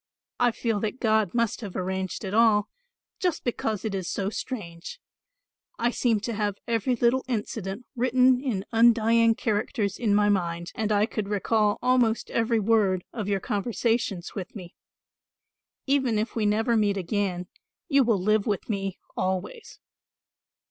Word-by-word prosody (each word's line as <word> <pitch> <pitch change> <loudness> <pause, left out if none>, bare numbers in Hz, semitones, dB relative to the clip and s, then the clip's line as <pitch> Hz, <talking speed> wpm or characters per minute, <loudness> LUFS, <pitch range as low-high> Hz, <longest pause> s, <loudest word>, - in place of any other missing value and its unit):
I 245 - +4
feel 225 -2 -1
that 215 +4 -3
God 220 -4 +1
must 235 0 0
have 200 -5 -7
arranged 190 +2 -3
it 190 - -4
all, 215 -2 +4 0.5
just 355 -3 -1
because 220 -3 -2
it 215 - -2
is 190 -3 -3
so 195 0 -2
strange. 200 - -6 0.8
I 240 +1 +1
seem 235 -3 +1
to 230 +2 -3
have 205 -2 -1
every 235 +2 +1
little 240 +3 +2
incident 215 -2 -4
written 255 +1 +3
in 210 -8 -2
undying 230 0 +4
characters 210 -1 -1
in 215 -4 +2
my 205 0 +4
mind, 170 -4 -1
and 220 -1 -2
I 205 0 +3
could 215 -2 -4
recall 210 0 +1
almost 250 -3 +2
every 230 0 +1
word 200 -4 +2
of 215 -4 -4
your 200 -1 +1
conversations 210 -2 -1
with 190 +1 -7
me. 180 -4 -9 1.1
Even 265 -5 +2
if 215 +2 -2
we 215 -2 +1
never 225 +3 +2
meet 205 -2 +2
again, 190 -1 -2 0.4
you 280 -4 +4
will 230 -4 +2
live 215 +3 +1
with 205 -4 -1
me 195 -3 -2 0.2
always." 190 - -3
215 Hz, 155 wpm, -26 LUFS, 200-235 Hz, 1.1 s, I